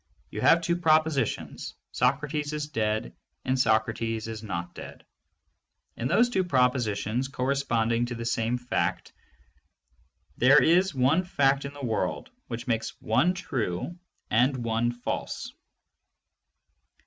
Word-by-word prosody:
You -, -, -5 dB
have 165 Hz, -, +5 dB
two 170 Hz, +1 st, 0 dB
propositions: 155 Hz, -4 st, 0 dB, 0.2 s
"Socrates 145 Hz, +4 st, 0 dB
is 150 Hz, -1 st, -3 dB
dead" 110 Hz, -, -1 dB, 0.3 s
and 130 Hz, 0 st, +1 dB
"Socrates 110 Hz, -1 st, +1 dB
is 110 Hz, -1 st, -6 dB
not 85 Hz, -5 st, -5 dB
dead." -, -, -10 dB, 0.9 s
And 120 Hz, +2 st, -3 dB
those 240 Hz, +9 st, +4 dB
two 190 Hz, -6 st, +1 dB
propositions 125 Hz, -, +1 dB
corresponding 120 Hz, -4 st, 0 dB
to 120 Hz, -, -5 dB
the 115 Hz, 0 st, -5 dB
same 115 Hz, +1 st, 0 dB
fact, 125 Hz, 0 st, -2 dB, 1.2 s
there 135 Hz, +4 st, +6 dB
is 180 Hz, +1 st, +3 dB
one 135 Hz, +8 st, +3 dB
fact 140 Hz, -5 st, +1 dB
in 140 Hz, -, -6 dB
the 145 Hz, -2 st, -6 dB
world 110 Hz, -, -2 dB, 0.2 s
which 120 Hz, -1 st, -5 dB
makes 115 Hz, -3 st, -2 dB
one 175 Hz, +11 st, +2 dB
true 130 Hz, -, -3 dB, 0.4 s
and 125 Hz, +5 st, +3 dB
one 115 Hz, +1 st, 0 dB
false. 120 Hz, 0 st, -5 dB
125 Hz, 125 wpm, -27 LUFS, 115-145 Hz, 1.2 s, there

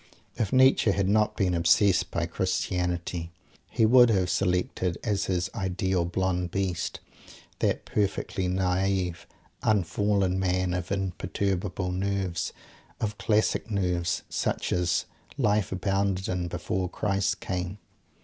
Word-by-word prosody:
If 105 Hz, -4 st, -1 dB
Nietzsche 130 Hz, -3 st, +5 dB
had 100 Hz, -1 st, +1 dB
not 105 Hz, +1 st, +2 dB
been 95 Hz, -3 st, +1 dB
obsessed 85 Hz, +2 st, +3 dB
by -, -, -1 dB
Christianity 90 Hz, -1 st, -2 dB, 0.4 s
he 110 Hz, -, +2 dB
would 120 Hz, +1 st, +7 dB
have 95 Hz, -5 st, +2 dB
selected 90 Hz, -1 st, 0 dB
as 100 Hz, -4 st, 0 dB
his 90 Hz, -1 st, 0 dB
"Ideal 95 Hz, -3 st, 0 dB
Blond 90 Hz, 0 st, -1 dB
Beast" 90 Hz, -3 st, -2 dB, 0.6 s
that -, -, 0 dB
perfectly 95 Hz, -2 st, -1 dB
naive, 90 Hz, -1 st, 0 dB, 0.3 s
"unfallen" 100 Hz, -1 st, +1 dB
man, 90 Hz, -1 st, 0 dB
of 90 Hz, 0 st, -3 dB
imperturbable 95 Hz, -1 st, -2 dB
nerves, 95 Hz, -1 st, -1 dB, 0.5 s
of 105 Hz, -1 st, -3 dB
classic 110 Hz, +1 st, +1 dB
nerves, 90 Hz, -4 st, 0 dB
such -, -, -1 dB
as 90 Hz, -1 st, +1 dB, 0.3 s
Life 105 Hz, -6 st, +1 dB
abounded 95 Hz, -1 st, 0 dB
in 90 Hz, -1 st, -2 dB
_before 90 Hz, +1 st, -2 dB
Christ 100 Hz, -1 st, 0 dB
came. 90 Hz, +1 st, -3 dB
95 Hz, 120 wpm, -27 LUFS, 90-100 Hz, 0.6 s, would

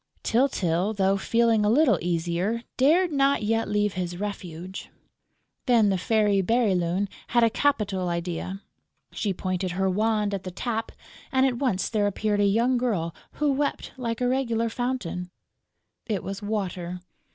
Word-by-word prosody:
Tyltyl, 210 Hz, -6 st, +1 dB
though 195 Hz, 0 st, +2 dB
feeling 230 Hz, +2 st, +2 dB
a 210 Hz, -, +3 dB
little 240 Hz, -, +4 dB
easier, 175 Hz, +6 st, -1 dB
dared 330 Hz, +7 st, +4 dB
not 275 Hz, -4 st, +2 dB
yet 225 Hz, 0 st, 0 dB
leave 210 Hz, -1 st, +1 dB
his 175 Hz, -1 st, -3 dB
refuge. 185 Hz, -3 st, -6 dB, 0.8 s
Then 230 Hz, -4 st, +5 dB
the 190 Hz, -, +1 dB
Fairy 210 Hz, -1 st, +2 dB
Bérylune 190 Hz, -3 st, +1 dB, 0.2 s
had 240 Hz, -1 st, +3 dB
a 230 Hz, -, +4 dB
capital 205 Hz, -10 st, 0 dB
idea: 175 Hz, +3 st, -4 dB, 0.5 s
she 210 Hz, -, -2 dB
pointed 185 Hz, -1 st, -2 dB
her 190 Hz, +1 st, 0 dB
wand 210 Hz, +1 st, +1 dB
at 195 Hz, -, -2 dB
the 185 Hz, -, -6 dB
tap; 225 Hz, +4 st, -3 dB, 0.4 s
and 260 Hz, 0 st, +3 dB
at 245 Hz, -3 st, 0 dB
once 235 Hz, -9 st, 0 dB
there 210 Hz, -2 st, +1 dB
appeared 205 Hz, +1 st, 0 dB
a 205 Hz, -, +4 dB
young 235 Hz, +5 st, +3 dB
girl 185 Hz, -10 st, -1 dB, 0.2 s
who 295 Hz, -1 st, +1 dB
wept 285 Hz, +1 st, -2 dB
like 235 Hz, -2 st, -3 dB
a 250 Hz, -, +2 dB
regular 235 Hz, -3 st, 0 dB
fountain. 225 Hz, -8 st, -3 dB, 0.8 s
It 210 Hz, -5 st, -2 dB
was 195 Hz, +2 st, -5 dB
Water. 180 Hz, -4 st, -3 dB
210 Hz, 150 wpm, -26 LUFS, 185-235 Hz, 0.8 s, Then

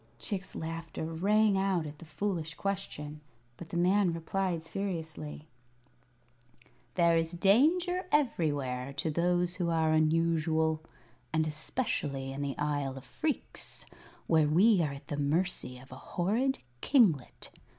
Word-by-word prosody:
Chick's 195 Hz, -3 st, -4 dB
laughter 165 Hz, 0 st, -5 dB
rang 200 Hz, +5 st, +3 dB
out 190 Hz, -4 st, +1 dB
at 150 Hz, 0 st, -8 dB
the -, -, -11 dB
foolish 160 Hz, 0 st, -3 dB
question, 155 Hz, -7 st, -4 dB, 0.3 s
but 165 Hz, +6 st, -10 dB
the 170 Hz, -, -3 dB
man 180 Hz, +1 st, +3 dB
replied 170 Hz, +1 st, -2 dB
seriously: 160 Hz, -5 st, -5 dB, 1.5 s
"There 170 Hz, -1 st, +4 dB
is 165 Hz, +1 st, +1 dB
danger 325 Hz, -, +3 dB
everywhere, 145 Hz, -, 0 dB
to 150 Hz, +3 st, -1 dB
those 175 Hz, +2 st, +1 dB
who 175 Hz, -2 st, -1 dB
are 160 Hz, -1 st, +2 dB
unusual, 160 Hz, 0 st, +2 dB, 0.5 s
and 160 Hz, 0 st, +2 dB
especially 150 Hz, -, -2 dB
in 135 Hz, +1 st, -5 dB
the 140 Hz, -1 st, -3 dB
Isle 145 Hz, -3 st, -1 dB
of 135 Hz, -, -9 dB
Phreex, 305 Hz, -, -4 dB, 0.4 s
where 160 Hz, -2 st, +4 dB
we 185 Hz, +6 st, +5 dB
are 150 Hz, -3 st, 0 dB
at 140 Hz, -, -11 dB
the 145 Hz, -, -3 dB
mercy 145 Hz, -3 st, 0 dB
of 130 Hz, +2 st, -15 dB
a 130 Hz, -, -8 dB, 0.2 s
horrid 230 Hz, +10 st, +2 dB, 0.2 s
kinglet. 190 Hz, -, +2 dB
165 Hz, 130 wpm, -31 LUFS, 150-195 Hz, 1.5 s, we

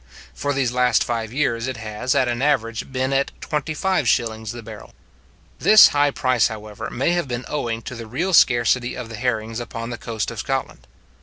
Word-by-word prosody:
For 145 Hz, -, -2 dB
these 135 Hz, -3 st, 0 dB
last 125 Hz, 0 st, +3 dB
five 115 Hz, -2 st, -3 dB
years, 125 Hz, -3 st, 0 dB
it 130 Hz, -2 st, -4 dB
has, 110 Hz, +3 st, -2 dB
at 130 Hz, -, +3 dB
an 120 Hz, 0 st, -2 dB
average, 115 Hz, -5 st, 0 dB
been 130 Hz, +1 st, -1 dB
at 135 Hz, 0 st, +1 dB
twenty 150 Hz, +1 st, -3 dB
five 180 Hz, -7 st, +1 dB
shillings 110 Hz, -2 st, 0 dB
the 120 Hz, -1 st, -8 dB
barrel. 110 Hz, -1 st, -11 dB, 0.7 s
This 215 Hz, 0 st, +8 dB
high 145 Hz, 0 st, +2 dB
price, 130 Hz, -4 st, +2 dB
however, 110 Hz, 0 st, -7 dB
may 135 Hz, +7 st, 0 dB
have 175 Hz, -4 st, 0 dB
been 120 Hz, 0 st, -4 dB
owing 115 Hz, -6 st, -3 dB
to 130 Hz, -, -7 dB
the 115 Hz, -2 st, -8 dB
real 170 Hz, -, -2 dB
scarcity 120 Hz, -3 st, +4 dB
of 125 Hz, -3 st, -6 dB
the 115 Hz, -, -7 dB
herrings 115 Hz, -1 st, -2 dB
upon 115 Hz, 0 st, -6 dB
the 120 Hz, -, -6 dB
coast 115 Hz, -3 st, -3 dB
of -, -, -7 dB
Scotland. -, -, -3 dB
120 Hz, 200 wpm, -22 LUFS, 115-135 Hz, 0.7 s, This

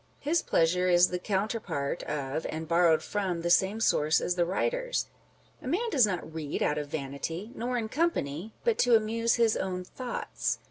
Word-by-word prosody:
His 315 Hz, +4 st, +1 dB
pleasure 180 Hz, +3 st, +2 dB
is 175 Hz, 0 st, +5 dB
the 180 Hz, -, -3 dB
counterpart 190 Hz, -7 st, -2 dB
of, 145 Hz, +1 st, -3 dB
and 160 Hz, +1 st, -5 dB
borrowed 170 Hz, -1 st, +4 dB
from 185 Hz, -5 st, -2 dB
the 170 Hz, -, +1 dB
same 195 Hz, +4 st, +3 dB
source 155 Hz, -8 st, +3 dB
as 180 Hz, -, 0 dB
the 175 Hz, -1 st, +1 dB
writer's. -, -, -1 dB, 0.6 s
A -, -, -8 dB
man 430 Hz, -, 0 dB
does 250 Hz, -, +5 dB
not 175 Hz, -5 st, -4 dB
read 155 Hz, -3 st, -3 dB
out 150 Hz, -, +1 dB
of 145 Hz, -, -5 dB
vanity, 155 Hz, -, -5 dB
nor 245 Hz, 0 st, -2 dB
in 225 Hz, -2 st, -2 dB
company, 215 Hz, -, -2 dB
but 470 Hz, -2 st, +1 dB
to 245 Hz, -1 st, +5 dB
amuse 225 Hz, +1 st, +2 dB
his 230 Hz, -2 st, +3 dB
own 185 Hz, -1 st, -3 dB
thoughts. 245 Hz, +6 st, -3 dB
185 Hz, 180 wpm, -29 LUFS, 160-230 Hz, 0.6 s, is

